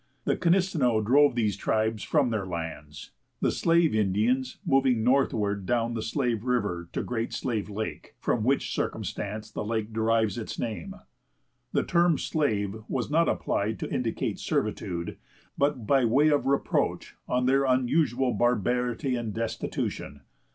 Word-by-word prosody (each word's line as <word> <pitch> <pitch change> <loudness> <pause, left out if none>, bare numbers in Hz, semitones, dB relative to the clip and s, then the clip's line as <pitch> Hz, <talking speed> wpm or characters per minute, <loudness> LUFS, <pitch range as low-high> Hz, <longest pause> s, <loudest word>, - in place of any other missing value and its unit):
The - - +1
Knisteneux 170 - +2
drove 140 +3 +5
these 110 -5 +1
tribes 110 +1 0
from 140 -6 +1
their 105 -4 -2
lands, 80 -4 -6 0.3
the - - +2
Slave 165 -1 +3
Indians 110 +6 +1
moving 130 -4 +3
northward 105 -7 +1
down 120 -1 +1
the 115 - -3
Slave 115 -2 -1
River 105 -9 -1
to - - -2
Great 115 -2 -3
Slave 110 -5 -2
Lake, 110 +1 -5
from 115 - 0
which 135 +4 +1
circumstance 105 +2 -4
the - - -4
lake 110 0 -2
derives 110 -1 +1
its 110 - -6
name. 120 - -4 0.8
The - - +1
term 170 -3 +3
Slave 110 -10 -1
was 125 +1 -2
not 165 +2 +3
applied 110 +2 -1
to - - -5
indicate 115 -3 -2
servitude, 85 -1 -2 0.4
but 140 -5 0
by 135 +3 +3
way 135 +7 +4
of 145 -2 +1
reproach 140 0 0
on 125 0 +1
their 135 +2 +3
unusual 130 0 +2
barbarity 125 +3 +1
and 120 -3 -3
destitution. 110 -9 -3
120 Hz, 145 wpm, -27 LUFS, 110-135 Hz, 0.8 s, drove